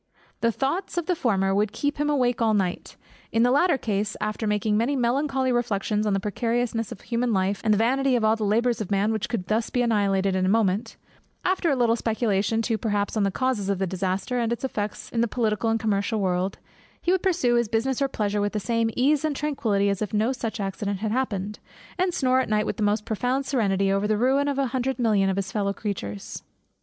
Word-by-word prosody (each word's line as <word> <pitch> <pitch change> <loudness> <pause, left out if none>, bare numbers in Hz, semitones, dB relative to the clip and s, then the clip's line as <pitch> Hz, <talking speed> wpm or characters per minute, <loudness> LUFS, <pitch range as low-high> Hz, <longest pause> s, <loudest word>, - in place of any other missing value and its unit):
The 230 - +2
thoughts 330 - -2
of 345 - 0
the 360 - +1
former, 195 - +1
would 205 +1 +1
keep 290 +5 -2
him 295 0 +1
awake 250 -5 +1
all 220 -2 +3
night; 185 -3 -2 0.4
in 230 - +3
the 245 - +4
latter 290 +3 +3
case, 205 -3 -2
after 215 +1 -2
making 210 0 +1
many 235 +6 +1
melancholy 265 +1 +1
reflections 215 -3 0
on 205 - +1
the 195 - +1
precariousness 230 +2 -1
of - - -8
human 235 0 -1
life, 195 +1 0
and 220 - +2
the 210 - +4
vanity 260 +4 +2
of 235 - +1
all 220 0 +4
the 220 - -4
labours 230 +3 +1
of 205 - -4
man 205 +2 +1
which 215 -2 -2
could 225 -7 -2
be - - -20
thus 220 +1 0
annihilated 200 -5 +1
in 185 - +1
a 185 - +2
moment; 215 +1 +1 0.5
after 365 -2 +1
a 280 - +2
little 235 -2 +3
speculation 225 -1 0
too 225 -1 -1
perhaps 205 -2 -1
on 215 - +1
the 200 - +2
causes 220 -2 -1
of 200 - +1
the 190 - 0
disaster, 190 +6 -2
and 230 -1 0
its 235 +3 -3
effects 210 -5 -4
in 230 - 0
the 235 - +2
political 225 -1 0
and 225 0 +1
commercial 215 +1 0
world; 185 0 0 0.4
he 350 - 0
would 375 -1 +2
pursue 345 -11 +2
his 235 -1 +2
business 240 +5 -1
or - - +4
his 270 - -4
pleasure 205 -3 -1
with 205 0 -1
the 210 - 0
same 230 +3 0
ease 280 +4 +3
and 310 -2 0
tranquillity 230 -9 0
as 200 0 -1
if 215 0 -2
no 220 +4 +2
such 235 -3 -4
accident 200 0 -2
had 215 -1 -1
happened; 210 -5 -2 0.4
and 365 0 +2
snore 260 -6 +2
at 260 - -1
night 215 0 +1
with - - -3
the - - -4
most 210 +1 +1
profound 250 +5 -1
serenity 195 -7 +1
over 195 +1 +1
the 215 0 +1
ruin 265 +5 +2
of 280 -1 -1
a 275 - +2
hundred 260 +1 -1
million 210 -5 +2
of 190 - 0
his 195 0 -3
fellow 200 -1 -1
creatures. 105 - -5
225 Hz, 235 wpm, -25 LUFS, 200-250 Hz, 0.5 s, the